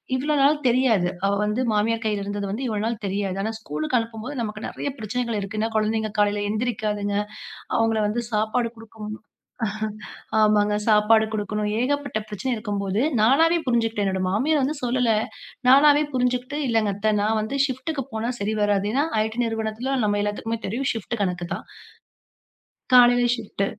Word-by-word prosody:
இவ்வளவு 290 +3 0
நாள் 295 +2 +5
தெரியாது, 235 -8 +3 0.2
அவ 200 - +2
வந்து 210 +4 0
மாமியார் 225 +2 +1
கைல 210 -2 0
இருந்தது 205 -1 -3 0.2
இவ்வளவு 215 -1 -1
நாள் 230 -2 -3
தெரியாது. 195 -1 -2
ஆனா, 220 +1 -2
ஸ்கூல்க்கு 155 - -1
அனுப்பும்போது 225 +4 -6
நமக்கு 215 -1 -4
நெறைய - - -4
பிரச்சனைகள் 230 0 -2
இருக்கு. 200 +2 -5
ஏன்னா, 225 - 0
கொழந்தைங்க 215 0 0
காலைல 205 0 +2
எந்திரிக்காதுங்க, 210 -3 -1 0.6
அவங்கள 225 -1 +2
வந்து 235 +3 -1
சாப்பாடு 220 +3 +1
குடுக்கணும் 215 -1 -8 1.3
ஆமாங்க, 210 -1 +3
சாப்பாடு 220 +1 +5
குடுக்கணும், 210 0 -2
ஏகப்பட்ட 285 -1 -1
பிரச்சன 210 +5 -2
இருக்கும்போது, 205 -1 -2 0.2
நானாவே 325 +8 +4
புரிஞ்சுக்கிட்டேன். 225 -4 +1
என்னோட 190 -1 -1
மாமியார் 280 +10 +2
வந்து 290 +4 0
சொல்லல, 245 -1 +1 0.6
நானாவே 290 +3 +7
புரிஞ்சுக்கிட்டு, 250 +2 0
"இல்லைங்க 225 -3 +2
அத்த, 205 +2 -2
நான் 220 +1 +1
வந்து 220 +6 -3
ஷிப்ட்க்கு 270 +3 -3
போனா, 220 +2 -2
சரி 205 +2 -1
வராது", 205 -1 +2
ஏன்னா 280 - +2 0.2
IT 220 0 -4
நிறுவனத்துல 225 +4 -2
நம்ம 205 -1 +1
எல்லாத்துக்குமே 220 +2 -2
தெரியும் 255 +7 -1
ஷிப்ட் 225 +1 -4
கணக்குதான். 175 -2 -3 1.3
காலைல 245 0 +7
ஷிப்ட்டு 205 -3 -3
220 Hz, 145 wpm, -24 LUFS, 210-245 Hz, 1.3 s, நானாவே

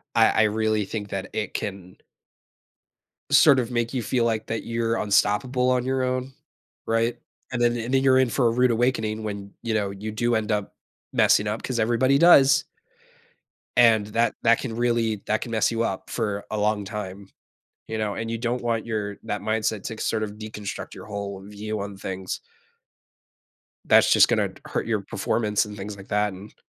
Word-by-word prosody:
I 115 -1 +6
I 110 - +3
really 110 0 +1
think 105 0 -5
that 95 -1 -4
it 105 - -3
can 95 -2 -6 1.3
sort 145 -1 +7
of 120 -2 -1
make 120 0 -1
you 125 - -1
feel 120 +1 0
like 110 -2 -1
that 115 - -3
you're 115 0 0
unstoppable 115 +5 +2
on 125 -1 +2
your 130 0 0
own, 130 +1 -2 0.5
right, 115 +1 0 0.3
and 120 - -2
then 120 0 +3
and 120 +3 -3
then 135 - +4
you're 130 -1 +5
in 130 -1 +3
for 120 +1 +2
a - - +2
rude 125 +2 +3
awakening 110 -2 0
when, 100 -2 -5
you 115 -1 -2
know, 100 -2 0
you 100 +2 -6
do 120 +2 0
end 110 -1 0
up 105 -2 -2 0.4
messing 105 - +4
up 105 +2 -3
'cause 125 -3 -2
everybody 120 +5 +3
does. 140 -4 +6 1.1
And 115 -3 +5
that 115 +1 +1
that 115 0 +4
can 115 -4 -5
really 115 -3 0
that 110 0 +1
can 120 - -6
mess 110 -2 +2
you 115 - 0
up 95 -4 -3
for 105 -3 -2
a - - -2
long 105 0 +1
time, 100 -1 -6 0.6
you 110 - -4
know, 105 -2 -1
and 115 +2 -4
you 115 - -1
don't 120 +1 -2
want 115 -2 -1
your 105 -3 -3
that 105 - -3
mindset 110 -1 -1
to 115 - -4
c - - -12
sort 110 -1 -1
of 105 - -3
deconstruct 105 -1 -7
your - - -10
whole 100 -2 -5
view 105 +1 -5
on 100 0 -6
things. 95 -1 -5 1.5
That's - - +5
just - - +6
gonna - - +1
t - - -16
hurt - - -3
your - - 0
performance 105 -3 0
and 105 0 -9
things 100 +1 -6
like 95 0 -13
that, 105 0 +1
and 95 +3 -11
110 Hz, 195 wpm, -24 LUFS, 105-120 Hz, 1.5 s, sort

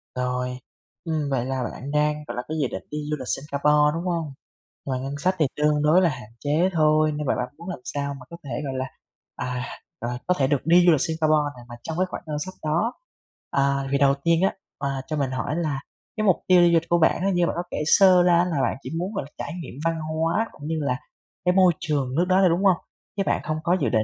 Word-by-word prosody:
Rồi. 125 0 -2 0.5
Ừm, 155 -4 -1
vậy 130 -3 0
là 130 -1 -2
bạn 135 +3 -6
đang, 150 0 +1
gọi - - -5
là, - - 0
cái 160 +1 -3
dự 135 - +2
định 95 - -5
đi 150 - -3
du - - +2
lịch 130 - -7
Singapore, 150 +2 +2
đúng 165 +2 -3
hông? 165 -5 -2 0.5
Ngoài 130 -2 -2
ngân 135 +2 -4
sách 185 +6 +1
thì 155 - +4
tương 150 0 +2
đối 155 +5 +5
là 175 - +4
hạn 125 -6 -7
chế 155 +6 +2
thôi 155 -1 +3
nhưng 150 0 -3
mà - - +2
bạn 125 - -2
muốn 170 +3 -8
làm 175 - -5
sao 140 +1 -3
mà 135 -2 -11
có 170 - -9
thể, 140 - -9 0.2
gọi 135 - -3
là, 130 - -1 0.5
à, 125 0 -3 0.4
rồi, 120 +1 -3
có 180 - +4
thể 135 - +2
được 140 -1 0
đi 175 +2 +6
du 175 - +7
lịch 155 - +3
Singapore 155 -2 +2
này 120 - -13
mà 120 - -8
trong 160 0 -4
cái 185 - +2
khoảng - - -6
ngân 150 -1 -2
sách 185 +5 -5
đó. 170 +11 +1 0.6
À, 140 0 +1
thì 140 - +3
đầu 140 0 +4
tiên 170 +1 +3
á, 195 - +3 0.2
ờ, 140 - -2 0.2
cho 155 - -2
mình 140 -3 0
hỏi 130 +4 -2
là 155 -5 -1 0.4
cái 215 - 0
mục 190 -4 +4
tiêu 180 -2 +6
du 170 - +6
lịch 165 0 +2
của 175 - +3
bạn 160 - +3
á, 195 - +2
như 175 -1 +2
bạn - - -2
có 175 - -1
kể - - -3
sơ 185 +1 +6
ra 175 -1 +5
á 175 - +3
là 160 -6 -1
bạn - - 0
chỉ - - -6
muốn, 185 +5 -3
gọi 195 - -2
là, - - -23
trải - - -5
nghiệm - - -9
văn 165 -1 +1
hóa 160 +7 0
cũng 145 - -10
như 160 - -1
là 140 -3 0 0.5
cái 180 - +4
môi 185 -2 +6
trường 140 -6 -1
nước 170 +4 +3
đó 185 - +4
thôi, 185 - +5
đúng 175 +4 +1
hông? 185 -3 +5 0.4
Chứ 195 - +2
bạn - - +1
hông 155 0 -1
có 180 +2 +2
dự - - +2
định 110 -2 +2
150 Hz, 265 wpm, -24 LUFS, 140-170 Hz, 0.6 s, du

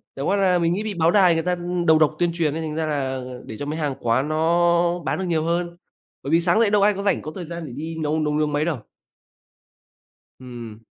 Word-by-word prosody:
chẳng 140 - -3
qua 195 - +2
là 185 -2 +3
mình 170 0 +1
nghĩ 205 - -2
bị 215 -2 -3
báo 165 -1 +2
đài 185 -3 +5
người 165 0 0
ta, 180 0 0
ưm, 175 0 -3
đầu 160 -1 +5
độc 155 0 +3
tuyên 175 -1 +2
truyền 160 -4 0
ấy, 165 - -3
thành 155 -1 -4
ra 160 0 -1
là 135 -4 -2 0.2
để 110 - -8
cho 145 - -5
mấy 155 +2 -4
hàng 145 -3 -1
quán 130 +5 0
nó 170 +2 +2
bán - - -1
được 190 - -2
nhiều 165 -3 0
hơn. 170 +1 -2 0.5
Bởi 140 - -4
vì 165 - +5
sáng 175 +6 +2
dậy 230 - +4
đâu 205 -1 +3
ai 205 +1 +4
có 200 - -5
rảnh, 200 - +1
có 155 - -7
thời 180 -3 -6
gian 170 0 -6
để 125 - -8
đi 160 +2 -5
nấu 155 +1 0
nấu 150 -1 0
nướng 150 -1 0
mấy 150 +2 +1
đâu. 165 -5 -1 1.6
Ừm. 120 -4 -9
165 Hz, 265 wpm, -22 LUFS, 150-175 Hz, 1.6 s, đài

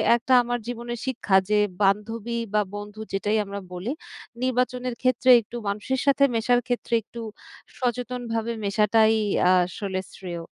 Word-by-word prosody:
একটা 240 +2 0
আমার 245 0 -2
জীবনের 240 -1 -5
শিক্ষা 215 -6 0
যে, 210 - +3 0.3
বান্ধবী 225 +4 0 0.2
বা 210 - +4
বন্ধু 205 +1 -8
যেটাই 210 +2 +1
আমরা 200 0 -6
বলি; 185 +8 -4 0.5
নির্বাচনের 250 -1 0
ক্ষেত্রে, 255 0 +2
একটু 235 +3 -9
মানুষের 215 +6 -1
সাথে 280 0 +4
মেশার 245 +2 +3
ক্ষেত্রে 245 -1 -2
একটু 235 +1 -9 0.6
সচেতনভাবে 240 -2 -2
মেশাটাই 220 +2 +3 0.5
আসলে 190 +1 -4
শ্রেয়। 175 -3 -6
230 Hz, 130 wpm, -25 LUFS, 205-245 Hz, 0.6 s, বা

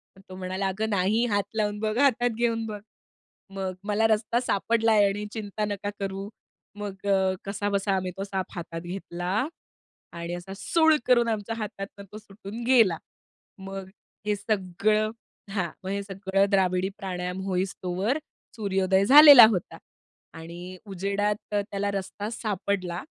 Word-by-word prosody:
तर 190 - -17
तो 185 - -8
म्हणाला 185 +1 -2
"अगं 215 +4 -2
नाही, 205 +4 +2
हात 205 -3 +1
लावून 210 -1 0
बघ, 215 +1 -1
हातात 245 -3 +3
घेऊन 230 -1 0
बघ." 210 -1 -5 0.8
मग 190 -1 -3
मला 210 +2 +2
रस्ता 220 +2 +1
सापडलाय 225 -1 +2
आणि 205 +1 -3
चिंता 210 -1 -3
नका 205 -1 -3
करू. 195 0 -4 0.5
मग 200 -1 -7
अ, 190 -1 +3
कसाबसा 200 0 -1
आम्ही 185 -1 -2
तो 195 - -3
साप 190 -2 -3
हातात 165 -1 -6
घेतला 180 +4 -3 0.7
आणि 170 0 -5
असा 175 +2 -7
सूळ 320 +8 +3
करून 240 -2 +4
आमच्या 225 0 -2
हातातून 200 -2 -6
तो 215 - -8
सुटून 210 +1 -9
गेला. 225 -10 +5 0.6
मग 195 -1 -7 0.4
हे 210 - +2
सगळं 215 +1 0 0.4
हां, 185 -4 -1
मग 185 - -5
हे 200 +1 -1
सगळं 195 0 0
द्राविडी 185 -1 +2
प्राणायाम 180 -2 -4
होईस्तोवर 190 +4 -1 0.4
सूर्योदय 195 -2 +1
झालेला 285 0 +11
होता 185 -5 -3 0.6
आणि 175 +3 -9
उजेडात 200 +2 -1 0.2
तर 205 -1 +1
त्याला 200 0 -1
रस्ता 200 +1 -4
सापडला 195 -5 -2
200 Hz, 140 wpm, -26 LUFS, 190-215 Hz, 0.8 s, झालेला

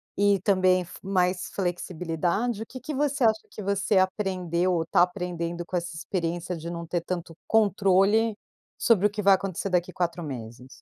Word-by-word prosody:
e 200 -1 +3
também 185 -2 +3
f 175 - -10
mais 185 -1 0
flexibilidade, 180 +4 -2
o - - -4
que 255 - -9
que 295 +5 -6
você 280 -1 0
acha 220 -1 +3
que 210 - -8
você 200 +1 +1
aprendeu 185 -2 +1
ou 165 -1 0
tá 165 - +3
aprendendo 175 -2 -1
com 180 - -5
essa 175 -1 -3
experiência 175 +1 -3
de 165 +1 -6
não 170 0 -5
ter 170 +1 -2
tanto 170 -1 -5
controle, 205 +1 +3 0.4
sobre 210 -4 +4
o - - -6
que 210 +1 -4
vai 195 - +7
acontecer 195 0 -1
daqui 180 0 +1
4 175 -1 -2
meses? 125 -3 -7
185 Hz, 180 wpm, -26 LUFS, 170-200 Hz, 0.4 s, vai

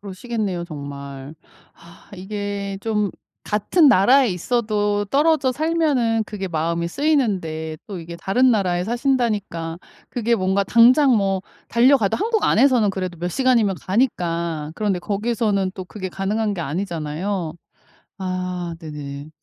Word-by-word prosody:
그러시겠네요 200 -2 -4
정말. 140 -2 -8 0.4
아 170 0 -18
이게 200 0 -4
좀 210 -3 0 0.3
같은 275 - +3
나라에 250 +4 +5
있어도 205 +1 0
떨어져 280 +1 +2
살면은 285 -7 +1
그게 195 -3 -5
마음이 170 +1 -1
쓰이는데 180 - 0
또 200 -5 -6
이게 170 +1 -8
다른 250 +9 +2
나라에 180 -5 +1
사신다니까 220 - -1 0.3
그게 235 -1 +1
뭔가 190 0 +1
당장 245 +5 +5
뭐 195 -2 +1 0.3
달려가도 240 -3 +4
한국 440 +1 0
안에서는 245 -4 +4
그래도 185 -3 -4
몇 175 - -2
시간이면 235 -7 +2
가니까 170 - -1
그런데 200 -3 0
거기서는 205 -1 -1
또 185 - -6
그게 190 0 -6
가능한 205 +2 -1
게 175 - -5
아니잖아요. 165 +1 -3 0.6
아 180 -2 -3
네네. 145 -2 -7
200 Hz, 305 characters per minute, -21 LUFS, 175-235 Hz, 0.6 s, 나라에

